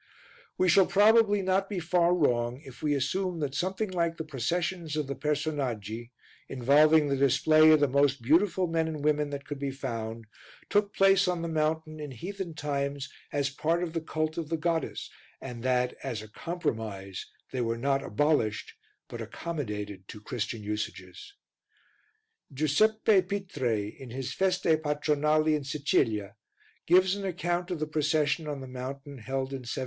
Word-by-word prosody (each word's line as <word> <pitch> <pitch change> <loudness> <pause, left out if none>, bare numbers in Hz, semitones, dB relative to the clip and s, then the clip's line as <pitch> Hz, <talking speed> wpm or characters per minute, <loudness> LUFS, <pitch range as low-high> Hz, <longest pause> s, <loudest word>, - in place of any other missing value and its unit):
We 185 - +3
shall 185 +2 +6
probably 205 0 +5
not 190 +1 +1
be 205 - -3
far 175 +1 +2
wrong 120 -6 +1
if 130 -2 -12
we 150 -1 +1
assume 180 +7 -1
that 140 -2 -2
something 190 +5 -2
like 170 -2 0
the 160 - -3
processions 160 +4 -2
of 150 -1 -1
the 140 - -3
Personaggi, 135 -7 -2 0.4
involving 150 +4 +4
the 140 - +1
display 140 +4 +5
of 155 -1 +7
the 145 - +5
most 140 +1 +2
beautiful 175 - +3
men 165 -1 0
and 155 -2 -5
women 150 -1 +2
that 140 -1 -6
could 145 -2 -6
be 140 0 -2
found, 115 -4 -5 0.5
took 205 0 +2
place 195 0 +5
on 175 -2 -1
the - - -2
mountain 155 0 -1
in 150 -1 -5
heathen 175 - -6
times 140 -1 -3 0.2
as 140 -1 0
part 165 +5 0
of 165 -2 -4
the 165 - -1
cult 155 0 -2
of 160 -2 -5
the 165 - 0
goddess 165 0 -2 0.3
and 125 -3 -7
that, 125 0 +1
as 120 -6 -4
a - - -10
compromise, 110 - -4 0.2
they 130 - -2
were 115 0 -1
not 135 +3 +1
abolished 135 -4 0 0.3
but - - -7
accommodated 105 - -5
to 105 - -9
Christian 115 -1 -4
usages. 105 - -6 1.2
Giuseppe 190 +9 +3
Pitre, 145 - -2
in 130 - -9
his 130 +2 -4
Feste 180 -4 +2
Patronali 150 +1 +2
in 150 -2 0
Sicilia, 110 -8 0 0.5
gives 185 +1 +5
an 200 - -6
account 175 -1 -2
of 175 -3 -3
the 155 - 0
procession 155 +1 0
on 145 -2 -4
the 130 - -7
mountain 135 +2 -7
held 130 +4 -3
in 135 - -4
1752. 120 +1 -5
150 Hz, 165 wpm, -29 LUFS, 130-170 Hz, 1.2 s, of